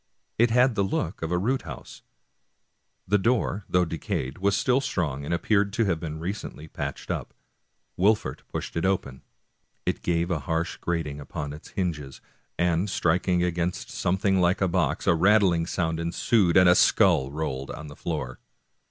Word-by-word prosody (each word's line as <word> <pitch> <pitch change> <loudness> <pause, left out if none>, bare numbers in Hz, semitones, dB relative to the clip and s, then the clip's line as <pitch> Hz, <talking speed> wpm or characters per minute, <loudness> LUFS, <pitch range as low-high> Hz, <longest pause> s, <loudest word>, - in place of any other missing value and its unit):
It 120 +1 +5
had 125 +2 +4
the 100 - +1
look 95 -1 -2
of 80 +1 -3
a 90 - +2
root 125 +9 0
house.^ - - -10 1.1
Tlie 100 +1 +2
door, 110 -3 0
though 90 0 +3
decayed, 75 -4 -4
was 100 +1 +2
still 130 +2 +2
strong, 75 - -2
and 70 - -5
appeared 100 +4 +2
to 115 +1 +2
have 90 -5 0
been 80 -1 -5
recently 85 -2 -6
patched 70 -2 -5
up. - - -5 0.6
Wolfert 105 +3 +2
pushed - - -5
it 85 - -1
open. 95 -9 -1 0.6
It - - -1
gave 85 +1 0
a 85 - 0
harsh 80 +5 -2
grating 80 -4 -3
upon 75 0 -5
its 75 - -11
hinges, 75 -8 -3 0.4
and 85 +3 +1
striking 90 0 +1
against 85 0 -2
something 95 +1 +1
like 90 +1 +2
a 95 - +2
box, 90 0 0
a - - +5
rattling 90 -1 +3
sound 80 -3 -1
ensued, 85 +2 +2
and 90 -1 +7
a 90 - +8
skull 85 -8 +4
rolled 70 -3 -4
on 75 - -7
the 70 -1 -10
floor. 75 -8 -4
85 Hz, 170 wpm, -26 LUFS, 80-95 Hz, 1.1 s, a